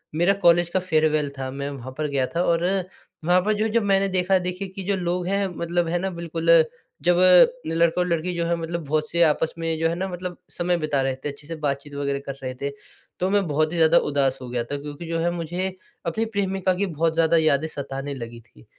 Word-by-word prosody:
मेरा 175 +4 +3
कॉलेज 170 0 +5
का 185 - +1
फ़ेयरवेल 155 -4 +1
था 130 0 -3
मैं 140 +1 -4
वहाँ 130 -2 -7
पर 155 -1 -1
गया 140 -2 0
था 175 - +2
और 170 +1 +1 0.6
वहाँ 180 +2 +4
पर 215 +3 +1
जो 215 +1 0
जब 230 0 +1
मैंने 195 0 +2
देखा 185 +1 +2
देखिए 180 +2 -4
कि 195 - -5
जो 200 +1 0
लोग 180 -1 -2
हैं 200 0 +1
मतलब 170 0 0
है 175 - +1
ना 190 +1 -1
बिल्कुल 170 -1 -4 0.5
जब 175 0 +4 0.5
लड़का 165 +2 +2
और 180 - 0
लड़की 170 +1 -1
जो 170 0 -1
है 170 0 +1
मतलब 165 -1 -4
बहुत 155 +1 0
से 170 0 +1
आपस 160 +1 +2
में 165 -1 -1
जो 165 0 +2
है 170 - -2
ना 190 +2 -2
मतलब 180 -1 -6
समय 175 0 0
बिता 150 -4 0
रहे 135 -1 0
थे, 135 +2 -5
अच्छे 145 +1 -10
से 165 - -5
बातचीत 145 -1 -3
वग़ैरह 140 -1 -1
कर 140 - -4
रहे 130 - -3
थे। 140 0 -2 0.5
तो 185 +1 +1
मैं 200 -1 +2
बहुत 155 +1 +1
ही - - -2
ज़्यादा 160 +1 +6
उदास 140 -3 +2
हो 125 - -7
गया 120 -1 -1
था 145 +4 -4
क्योंकि 150 +3 -7
जो 165 0 -1
है 170 +1 +1
मुझे 175 +3 -3 0.3
अपनी 220 +7 -1
प्रेमिका 195 -3 0
की 200 +2 0
बहुत 165 -2 0
ज़्यादा 165 0 +3
यादें 155 -1 +2
सताने 140 -1 -5
लगी 115 -2 -7
थी, 60 - -21
165 Hz, 235 wpm, -24 LUFS, 145-180 Hz, 0.6 s, ज़्यादा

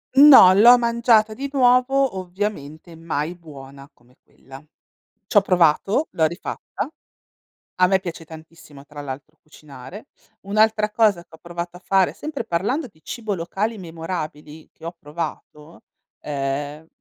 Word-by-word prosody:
No, 270 -10 +9
l'ho 235 +6 +7
mangiata 235 -2 +2
di 275 +5 -6
nuovo, 255 -2 +2
ovviamente 175 -4 -6
mai 160 0 -4
buona 140 -4 -13
come 125 -2 -28
quella. 135 +2 -15 0.6
C'ho 205 - +4
provato, 185 - +1
l'ho 160 - +1
rifatta, 170 +4 -5 0.9
a 185 - +3
me 190 +1 +2
piace 170 -3 -7
tantissimo 160 -3 -14
tra 150 -1 -10
l'altro 145 +3 -9
cucinare. 150 - -13 0.4
Un'altra 215 +1 +2
cosa 210 -5 +2
che - - -56
ho 160 - -14
provato 175 0 -7
a 180 - -15
fare, 190 -2 +2
sempre 295 -5 -6
parlando 225 - -2
di 155 -4 -29
cibo 220 -4 -4
locali 195 +6 -3
memorabili 160 -3 -7
che 165 - -12
ho 170 +1 -7
provato, 150 0 -8 0.4
ehm 145 +2 -4
175 Hz, 135 wpm, -21 LUFS, 150-215 Hz, 0.9 s, No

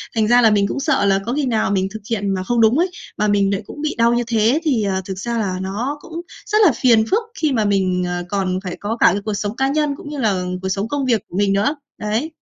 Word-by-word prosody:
thành 220 -1 +2
ra 240 +2 +5
là 225 - +6
mình 200 -1 +3
cũng 275 - -3
sợ 275 -7 +1
là 195 -1 +3
có 235 - -2
khi 290 +1 0
nào 225 -5 0
mình 190 -1 +1
thực 220 - -7
hiện 205 -4 -1
mà 185 -1 -2
không 235 +4 +1
đúng 225 +4 +4
ấy, 360 +2 +2 0.3
mà 210 - +1
mình 200 -1 +2
nại 195 -1 -1
cũng 295 - -9
bị 305 0 -2
đau 235 0 +4
như 240 0 +1
thế 230 +5 +2
thì, 265 -9 +1
ờ, 190 -2 -1
thực 190 -1 -5
ra 235 +3 -2
là 195 -5 -1
nó 225 +10 -3
cũng 335 +1 -7 0.3
rất 425 - +2
là 335 - +6
phiền 230 -4 +5
phức 435 +4 +2 0.2
khi 310 -2 +2
mà 220 -4 +1
mình, 190 -3 +1
ờ, 175 0 -3
còn 190 -2 -1
phải 180 -2 -5
có 215 +3 -3
cả - - +4
cái 200 +3 -2
cuộc 215 - -1
sống 205 +1 -3
cá 270 +2 +1
nhân 295 0 0
cũng 290 - -10
như 295 - -6
là 200 -7 +1 0.2
cuộc 190 - -3
sống 195 +3 -1
công 280 +2 -2
việc 235 -5 +2
của 180 - -6
mình 200 -1 +2
nữa. 210 +10 +1 0.2
Đấy. 220 +9 -2
220 Hz, 290 wpm, -19 LUFS, 195-260 Hz, 0.3 s, là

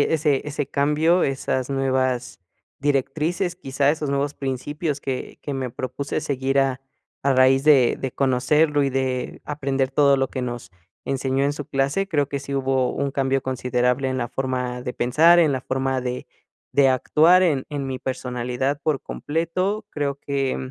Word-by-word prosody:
ese 150 -2 +1
ese 145 -1 -3
cambio, 150 +5 +2
esas 130 -1 -1
nuevas 130 -2 -1 0.4
directrices, 155 +6 -1
quizá 140 -4 +1
esos 150 -1 -2
nuevos 140 +1 0
principios 145 +3 -3
que 130 -2 -5
que 145 - -4
me 130 -2 -3
propuse 130 +4 -4
seguir 135 -2 0
a 135 -1 0 0.4
a 140 - +4
raíz 130 +1 +4
de 135 -6 +5
de 130 -2 -3
conocerlo 145 +3 +2
y - - +1
de 130 -1 -2
aprender 135 -2 -1
todo 140 0 +4
lo 135 -1 0
que 130 - -4
nos 120 -7 -5 0.3
enseñó 135 0 -1
en 140 - +1
su 145 0 -6
clase. 140 +9 0
Creo 145 -6 0
que 140 - -3
sí 140 0 -6
hubo 130 -2 +1
un 140 0 -2
cambio 135 -1 0
considerable 125 0 0
en 130 - -2
la 120 -2 -2
forma 125 -1 -3
de 125 - -4
pensar, 160 +10 +5
en 160 -3 +4
la 130 -2 -1
forma 130 0 -1
de 125 0 -4 0.4
de 140 -1 +4
actuar, 160 +7 +4
en 150 -7 +2
en 145 -2 -4
mi 130 -1 -3
personalidad 125 +2 -2
por 145 -1 -1
completo. 185 +7 -2
Creo 140 -2 -3
que, 135 -2 -1
mm, 130 -1 -6
135 Hz, 170 wpm, -23 LUFS, 130-145 Hz, 0.4 s, de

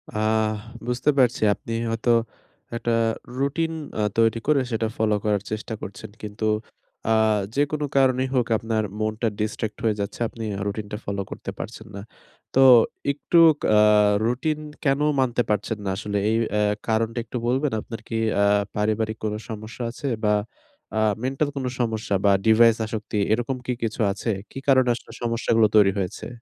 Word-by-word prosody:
আহ 110 0 +1 0.3
বুঝতে 125 +4 0
পারছি 125 -2 +3
আপনি 115 - -7 0.2
হয়তো 115 +1 +1 0.6
একটা 115 0 -1 0.5
রুটিন 160 +4 0 0.3
আ - - +2 0.2
তৈরি 115 0 +3
করে 150 -3 +4
সেটা 110 0 0
ফলো 110 -1 +2
করার 105 -2 +1
চেষ্টা 110 +1 -4
করছেন। 100 - -8
কিন্তু 105 +1 -5 0.6
আ - - +3 0.4
যেকোনো 145 +1 0
কারণেই 130 -1 +3
হোক 125 -3 +2
আপনার 110 -1 -1 0.2
মনটা 110 +2 -1
ডিসট্রাক্ট 110 0 -3
হয়ে 110 -2 +2
যাচ্ছে। 100 - -5
আপনি 115 0 -8
আ - - -5
রুটিনটা 105 0 -4
ফলো 100 0 -2
করতে - - -6
পারছেন - - -7
না। 100 - -6 0.5
তো - - +4 0.5
একটু 150 +4 0 0.3
কা - - +2 0.6
রুটিন 135 +6 0 0.3
কেন 135 0 +3 0.2
মানতে 125 -2 +2
পারছেন 105 +1 -1
না, 95 - -1
আসলে 105 0 -3
এই 110 - +2 0.2
আ - - +2 0.3
কারণটা 115 +1 0
একটু 120 +2 -5
বলবেন? 135 +4 +1
আপনার 115 - -8
কি 115 - -4 0.3
আ - - +4 0.3
পারিবারিক 110 +1 0
কোন 105 -1 -1 0.2
সমস্যা 110 +3 -6
আছে? 140 +4 -6 0.2
বা, 105 0 +3 0.6
আ - - -1 0.3
মেন্টাল 135 +3 0
কোন 135 -2 -3
সমস্যা 110 -4 -1
বা, 100 - +6 0.2
ডিভাইস 115 0 +6
আসক্তি, 110 -1 -4 0.2
এরকম 120 +3 -1
কি 125 - -1
কিছু 115 - -3
আছে? 105 +3 -4 0.2
কি - - -10
কারণে 130 -2 +5
আসলে 115 - -11
সমস্যাগুলো 115 -1 +2
তৈরি 100 -2 +6
হয়েছে? 90 -2 -4
115 Hz, 160 wpm, -24 LUFS, 110-125 Hz, 0.6 s, বা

